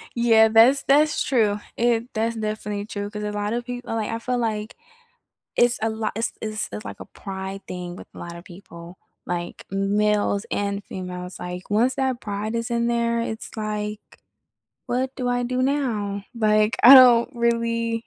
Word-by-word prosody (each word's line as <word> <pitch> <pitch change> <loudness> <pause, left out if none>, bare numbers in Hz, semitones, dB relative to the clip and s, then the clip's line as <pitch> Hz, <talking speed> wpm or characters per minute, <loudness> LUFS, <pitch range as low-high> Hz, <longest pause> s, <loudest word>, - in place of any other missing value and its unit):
Yeah, 225 -2 +5
that's 230 +5 +5
that's 295 +2 +3
true. 215 -5 +1 0.2
It 235 +1 +1
that's 230 0 -1
definitely 215 -2 -3
true, 205 -1 -5
'cause 210 0 -6
a 210 - -2
lotta 210 +3 -2
people 245 -1 -6
like, 220 -2 -2
I 225 - -3
feel, 250 +1 -2
like 220 -2 -2 0.8
it's 240 0 +3
a 225 - +1
lot 220 -1 -3
it's 225 - -1
it's, 215 0 -3 0.2
like, - - -8
a - - -6
pride 195 0 -7
thing 180 -1 -6
with - - -11
a - - -11
lotta 170 0 -8
people, 175 -1 -12 0.3
like, 175 0 -5
m 195 +1 0
males 210 0 +1
and 200 0 -2
females, 180 -1 -7
like 180 +1 -7
once 235 +5 +2
that 260 -2 -1
pride 210 +2 -4
is 230 +1 -2
in 235 0 +1
there, 235 0 +1
it's, 220 -1 -5
like 210 0 -3 0.9
"What 260 +2 -1
do 250 -2 -2
I 245 0 0
do 255 +1 -1
now? 225 -8 -1
Like, 215 -1 +2
I 255 +3 +11
don't 245 -2 +8
really" 230 -1 0
220 Hz, 175 wpm, -23 LUFS, 205-235 Hz, 0.9 s, I